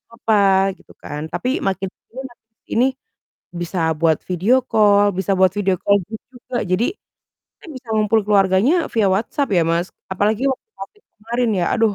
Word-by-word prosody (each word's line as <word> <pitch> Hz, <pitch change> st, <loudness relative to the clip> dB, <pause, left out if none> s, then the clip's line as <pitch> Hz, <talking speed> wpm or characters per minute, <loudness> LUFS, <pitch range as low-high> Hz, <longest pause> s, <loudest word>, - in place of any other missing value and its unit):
apa, 225 Hz, -2 st, 0 dB, 0.4 s
gitu -, -, -20 dB
kan, 145 Hz, 0 st, -6 dB
tapi 250 Hz, -, -2 dB, 0.2 s
makin 195 Hz, 0 st, -2 dB
ke -, -, -74 dB
sini 260 Hz, +3 st, -9 dB
makin 235 Hz, -, -24 dB
ke -, -, -65 dB
sini 245 Hz, +3 st, +3 dB, 0.8 s
bisa 175 Hz, +1 st, -4 dB, 0.2 s
buat 160 Hz, -2 st, +3 dB
video 185 Hz, +7 st, +2 dB
call, 205 Hz, -1 st, +4 dB
bisa 195 Hz, +1 st, 0 dB
buat 185 Hz, -1 st, +4 dB
video 195 Hz, -2 st, 0 dB
call 200 Hz, 0 st, +3 dB
itu 220 Hz, -, -11 dB, 0.2 s
juga, 245 Hz, +1 st, -7 dB
jadi 185 Hz, +6 st, +1 dB, 0.7 s
kan 375 Hz, -, -14 dB
bisa 250 Hz, -3 st, -13 dB
ngumpul 215 Hz, +1 st, +2 dB
keluarganya 205 Hz, -, +2 dB
via 220 Hz, -3 st, +2 dB
WhatsApp 245 Hz, +7 st, -1 dB
ya 170 Hz, -, +4 dB
Mas, 170 Hz, +2 st, 0 dB, 0.3 s
apalagi 210 Hz, +5 st, 0 dB
waktu 265 Hz, -, -5 dB
Covid 420 Hz, -1 st, -11 dB
kemarin 235 Hz, +2 st, -2 dB
ya, -, -, +1 dB
aduh, 225 Hz, -3 st, +2 dB
210 Hz, 175 wpm, -19 LUFS, 190-235 Hz, 0.8 s, call